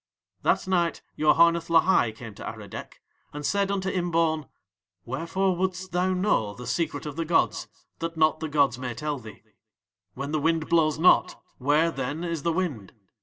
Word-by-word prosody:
That - - +1
night 175 -3 0
Yoharneth 170 +2 +4
Lahai 165 -8 +4
came 115 -2 -9
to - - -11
Aradec, - - -8 0.3
and 150 0 -5
said 200 +2 +1
unto 195 -1 -1
Imbaun: 165 -5 0 0.6
"Wherefore 170 +9 -1
wouldst 185 0 -2
thou 180 +1 +1
know 180 - +1
the 125 - -9
secret 145 +3 -2
of 150 0 -6
the 165 - 0
gods 165 +1 +1 0.3
that 165 0 -4
not 155 0 +3
the 160 - -4
gods 140 -4 +2
may 125 -2 -4
tell 145 +3 -3
thee? 110 -4 -12 0.7
"When 140 +2 -4
the 155 -1 0
wind 160 0 +1
blows 155 -3 +3
not, 170 +4 +4 0.2
where, 150 +5 +3
then, 140 +3 -4
is 170 -3 -3
the 170 - 0
wind? 160 - -3
160 Hz, 170 wpm, -26 LUFS, 140-175 Hz, 0.7 s, Yoharneth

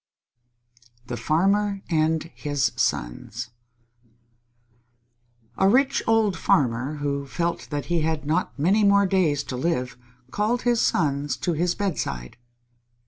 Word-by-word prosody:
_ - - -27
THE 120 - -4
FARMER 195 +8 +1
AND 160 0 0
HIS 145 -3 -1
SONS - - -2 2.1
A 190 - +5
rich 275 +5 +3
old 220 -4 +3
farmer, 130 -2 +1
who 140 -1 -3
felt 170 +4 -2
that 145 -2 -3
he 175 -2 0
had 155 -1 -1
not 160 +2 -1
many 190 +9 +3
more 200 0 +5
days 175 -7 +1
to 130 - -6
live, 125 -3 -2 0.3
called 225 +4 0
his 240 -2 +2
sons 145 -2 0
to 175 - +1
his 175 +2 0
bedside. 95 - -3
160 Hz, 125 wpm, -24 LUFS, 145-195 Hz, 2.1 s, A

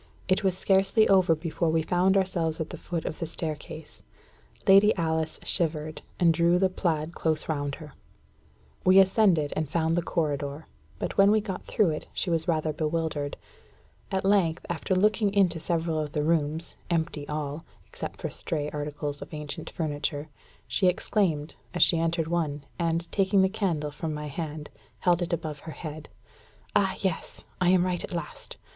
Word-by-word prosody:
It 185 +2 +2
was 190 -1 +1
scarcely 195 +3 +3
over 185 -4 +5
before 165 +1 -1
we 160 0 +2
found 185 +3 +3
ourselves 170 -4 0
at 160 - -3
the - - -6
foot 170 -2 -4
of 155 - -4
the 165 - -2
staircase. 155 -1 -6 0.7
Lady 200 +2 +7
Alice 160 -2 -1
shivered, 155 -3 -1 0.2
and 170 -2 +5
drew 170 +2 +3
the 190 +1 +3
plaid 165 -3 -1
close 160 -2 -1
round 145 -3 -2
her. 155 -3 -11 0.9
We 185 +1 +6
ascended, 190 -6 +4
and 155 -1 -1
soon - - -22
found 165 -1 +2
the 175 - +2
corridor; 145 -3 -2 0.3
but - - -3
when 195 0 +7
we 215 +1 +5
got 200 -3 -5
through 205 -7 +2
it, 155 - -5
she 180 - 0
was 165 +1 +1
rather 155 -2 +1
bewildered. 155 -2 -2 0.7
At 190 0 -1
length, 190 -5 +2
after 175 +2 -1
looking 210 +2 +3
into 180 -4 +3
several 165 -1 -1
of 150 -1 -3
the 150 -3 0
rooms, 160 0 0 0.2
empty 160 -3 -1
all, 150 +1 -3 0.2
except - - -7
for - - -3
stray 150 -4 -3
articles 145 -1 -4
of - - -8
ancient 150 +2 -5
furniture, 150 -1 -3 0.4
she 190 - +2
exclaimed, 175 -4 +1 0.2
as 175 - +6
she 165 - +4
entered 165 -1 0
one, 155 -4 -1 0.2
and, 170 0 0
taking 195 -1 +3
the 190 - +3
candle 170 -8 -1
from 155 +1 -4
my 150 0 -5
hand, 150 0 -5 0.3
held 175 -1 +3
it 175 - -2
above 155 -3 -3
her 160 - -8
head 155 -1 -7 0.7
"Ah, 190 -2 +3
yes! 190 -4 -3 0.2
I 180 - +4
am 180 -1 +4
right 180 -1 -1
at - - -6
last. 170 -3 -6
165 Hz, 175 wpm, -27 LUFS, 155-185 Hz, 0.9 s, Lady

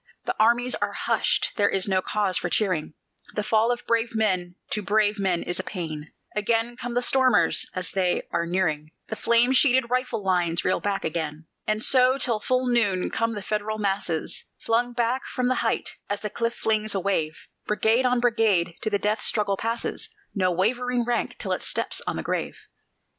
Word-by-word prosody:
The - - -1
armies 240 +3 +3
are - - -2
hushed - - +1
there 205 -1 +3
is 195 0 +2
no 190 -1 +2
cause 200 -1 0
for 175 - -3
cheering: 180 -6 0 0.4
The 210 - -1
fall 220 +2 +2
of 245 0 -3
brave 230 0 0
men 185 -5 0 0.2
to 210 - 0
brave 210 +1 +1
men 185 -3 0
is 175 - -2
a - - -2
pain. 160 -5 -5 0.3
Again 225 +3 +1
come 240 0 -6
the 245 - +1
stormers! 260 0 +3
and - - -6
as 180 - -3
they 185 -2 0
are 170 - -1
nearing 160 -4 -1 0.2
The 220 - -3
flame 235 +3 +3
sheeted 255 -2 +3
rifle 250 -4 -1
lines, 175 -3 +1
reel 185 - +2
back 200 -1 -2
again. 155 -1 -3 0.2
And 215 +1 0
so 255 0 +4
till 235 -5 0
full 255 +4 0
noon 215 -7 +1
come 230 0 0
the 205 - -5
Federal 215 +1 -2
masses 195 -6 -2
Flung 240 +2 0
back 240 +2 0
from 250 -1 -1
the 255 - +2
height, - - -1
as 205 0 -2
the 210 - -4
cliff 230 +2 -2
flings 215 -1 0
a - - +1
wave; 165 -5 -2 0.2
Brigade 220 +4 +2
on 250 -1 +2
brigade 220 -8 +2
to 220 - 0
the 205 - +1
death 210 +2 -1
struggle 205 -2 +1
passes, 230 - -3 0.2
No 185 -3 +1
wavering 240 +7 0
rank 240 0 -1
till - - -2
it - - -1
steps - - 0
on - - -1
the - - -4
grave. - - -3
215 Hz, 195 wpm, -25 LUFS, 185-240 Hz, 0.4 s, so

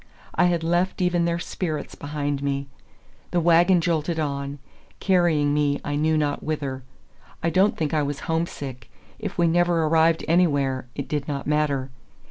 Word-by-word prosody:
I - - +3
had 170 -2 +1
left 175 +3 0
even 180 -2 +2
their 170 0 0
spirits 160 -3 -4
behind 145 -1 -3
me. 140 0 -1 0.6
The 175 - +1
wagon 175 +2 +5
jolted 165 -1 0
on, 140 -1 -3 0.4
carrying 170 -6 +2
me 145 -1 +1
I 145 - -2
knew 155 +2 +2
not 145 -1 0
whither. 140 -4 -3 0.6
I 165 - +1
don't 190 +5 +3
think 155 -2 -1
I 155 - +2
was 145 -1 -3
homesick. 145 -7 -4 0.3
If 210 -3 -5
we 170 - +3
never 170 0 +2
arrived 160 +1 +3
anywhere, 145 -7 +2
it 140 - -4
did 145 -2 -2
not 140 -2 -3
matter. 145 -3 0
155 Hz, 160 wpm, -24 LUFS, 145-170 Hz, 0.6 s, wagon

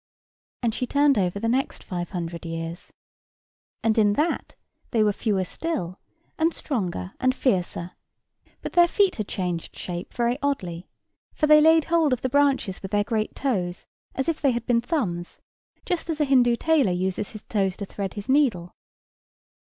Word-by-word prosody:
And 230 -2 +1
she 250 - -2
turned 285 -3 +3
over 185 +1 0
the 230 - -1
next 260 +4 -1
five 175 -2 -4
hundred 170 -2 -5
years. 165 +1 -6 0.9
And 225 0 +3
in 205 -1 +4
that 305 +8 -1 0.3
they 225 -2 +2
were 210 -1 +2
fewer 200 -3 0
still, 185 - -4 0.4
and 325 +1 +2
stronger, 180 - -3
and 255 0 +2
fiercer; 180 -8 0 0.7
but - - -5
their 345 0 +6
feet 390 +1 +2
had 215 -3 -3
changed 180 -3 -3
shape 175 0 -5
very 240 +2 0
oddly, 185 -12 -2 0.5
for - - +2
they 300 0 +7
laid 320 0 +5
hold 325 -5 +3
of 250 - -2
the 260 - +1
branches 275 -8 +2
with 190 - -6
their 205 0 +2
great 220 0 -2
toes, 185 -10 -2 0.3
as 265 - -1
if 330 -2 -1
they 280 - +4
had 235 0 -3
been 235 -1 +2
thumbs, 205 - -2 0.5
just 350 -1 -2
as 320 -2 -2
a 300 - +3
Hindoo 250 -3 +4
tailor 295 - +2
uses 185 +2 -1
his 215 -2 -10
toes 195 -3 -1
to 200 - -4
thread 195 -1 -5
his 205 -1 -6
needle. 250 -12 +2
225 Hz, 175 wpm, -25 LUFS, 185-280 Hz, 0.9 s, they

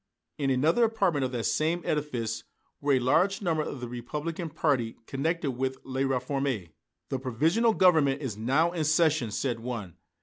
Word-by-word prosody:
In 140 -2 +1
another 150 - +3
apartment 195 -11 +1
of 130 - -3
that 120 -2 -2
same 165 +7 0
edifice 125 -7 -2 0.4
were 145 0 +2
a 130 - +4
large 180 +10 +2
number 165 -4 +1
of 140 -3 -5
the 120 - -4
Republican 150 +8 -4
party 140 -7 0
connected 155 +3 -1
with 130 +1 -2
"La 130 0 -3
Réforme." 135 - -1 0.4
"The 135 - -2
Provisional 160 - +2
Government 155 -7 +4
is 130 -8 -4
now 135 +10 +2
in 170 -3 -1
session," 155 -5 +3
said 120 +2 -2
one. 115 -7 -6
140 Hz, 165 wpm, -28 LUFS, 125-160 Hz, 0.4 s, a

